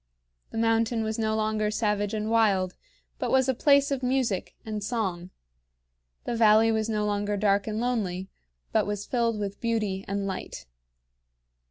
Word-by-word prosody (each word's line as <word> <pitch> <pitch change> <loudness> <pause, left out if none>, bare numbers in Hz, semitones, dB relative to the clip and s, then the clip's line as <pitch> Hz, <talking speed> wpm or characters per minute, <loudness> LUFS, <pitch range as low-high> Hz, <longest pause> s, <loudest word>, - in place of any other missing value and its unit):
The - - -7
mountain 225 0 +2
was 220 +1 -3
no 220 -1 +1
longer 215 -1 0
savage 210 -1 0
and 215 +1 -2
wild, 200 -5 +3 0.5
but - - -1
was 260 -1 +3
a 265 - +3
place 280 +2 +4
of 275 -2 -1
music 250 -7 -1
and 215 -2 -4
song; 190 -6 -2 1.0
the 235 - -2
valley 220 0 +5
was 220 0 0
no 210 -1 0
longer 205 0 -1
dark 200 0 +2
and 215 0 -2
lonely, 200 -7 -1 0.4
but - - +2
was 205 -1 -3
filled 235 -3 0
with 200 -1 -4
beauty 215 -5 -1
and 200 0 -2
light. 185 - -5
215 Hz, 160 wpm, -27 LUFS, 205-230 Hz, 1.0 s, valley